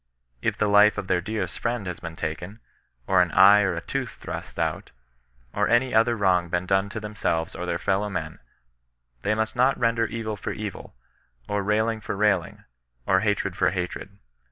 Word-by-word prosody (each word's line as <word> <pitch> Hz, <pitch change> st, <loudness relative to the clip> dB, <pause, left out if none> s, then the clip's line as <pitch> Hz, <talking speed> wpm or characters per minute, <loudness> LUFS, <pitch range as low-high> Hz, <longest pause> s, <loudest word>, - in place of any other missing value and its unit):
If -, -, -1 dB
the -, -, +1 dB
life 105 Hz, +1 st, +5 dB
of -, -, -3 dB
their 90 Hz, -1 st, +1 dB
dearest 100 Hz, -3 st, -4 dB
fnend 120 Hz, -3 st, -1 dB
has 90 Hz, -2 st, -5 dB
been 85 Hz, -1 st, -7 dB
taken, 90 Hz, +7 st, -5 dB, 0.5 s
or 95 Hz, -1 st, +4 dB
an 90 Hz, -, +2 dB
eye 100 Hz, +2 st, +7 dB
or 95 Hz, -4 st, 0 dB
a 85 Hz, -, -4 dB
tooth -, -, -3 dB
thrust -, -, -8 dB
out, -, -, -2 dB, 0.6 s
or -, -, +1 dB
any 120 Hz, +2 st, +2 dB
other 115 Hz, +2 st, +4 dB
wrong 90 Hz, -4 st, +2 dB
been 90 Hz, +1 st, -1 dB
done 95 Hz, +1 st, +1 dB
to 110 Hz, -, -5 dB
themselves 105 Hz, -6 st, -2 dB
or 90 Hz, -, -5 dB
their 85 Hz, -, -1 dB
fellow 95 Hz, +4 st, 0 dB
men, 80 Hz, -5 st, -5 dB, 0.8 s
they 105 Hz, -, +1 dB
must 110 Hz, 0 st, -2 dB
not 130 Hz, +3 st, +3 dB
render 115 Hz, -1 st, +1 dB
evil 110 Hz, -2 st, -4 dB
for 100 Hz, -, -5 dB
evil, 105 Hz, -, -7 dB, 0.5 s
or 105 Hz, 0 st, -1 dB
railing 110 Hz, +2 st, 0 dB
for 105 Hz, 0 st, -4 dB
railing, 100 Hz, -4 st, 0 dB, 0.4 s
or 95 Hz, -, +3 dB
hatred 105 Hz, -1 st, -1 dB
for -, -, +2 dB
hatred. 95 Hz, +1 st, -5 dB
100 Hz, 185 wpm, -25 LUFS, 90-110 Hz, 0.8 s, eye